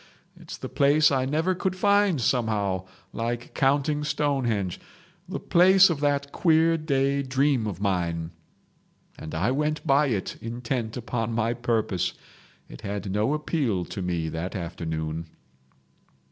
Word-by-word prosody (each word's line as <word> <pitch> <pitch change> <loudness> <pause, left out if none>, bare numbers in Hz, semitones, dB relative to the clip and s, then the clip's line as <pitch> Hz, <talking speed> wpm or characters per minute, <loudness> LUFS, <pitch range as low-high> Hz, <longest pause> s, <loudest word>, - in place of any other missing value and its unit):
It's - - -10
the - - -6
place 145 +2 +4
I 130 -2 +1
never 160 +7 +1
could 185 0 -2
find 200 -3 +3
somehow—like 110 0 -2
counting 145 +2 +1
Stonehenge—the 125 -11 -3
place 185 +1 +6
of 155 - -2
that 140 -1 0
queer 165 -1 +3
day 140 -3 +1
dream 135 -3 +1
of 95 -4 -5
mine.' 85 -4 -1 0.9
And 80 - -7
I 95 +10 +1
went 150 +3 -1
by 140 0 +4
it 105 -7 -2
intent 115 0 -3
upon 120 -1 -3
my 115 +1 +1
purpose. 115 -6 -1 0.5
It - - -12
had 100 -1 -4
no 105 +9 +1
appeal 135 - -1
to 95 - -6
me 85 -3 -2
that 80 +5 -4
afternoon. 80 -2 -4
120 Hz, 130 wpm, -26 LUFS, 100-150 Hz, 0.9 s, place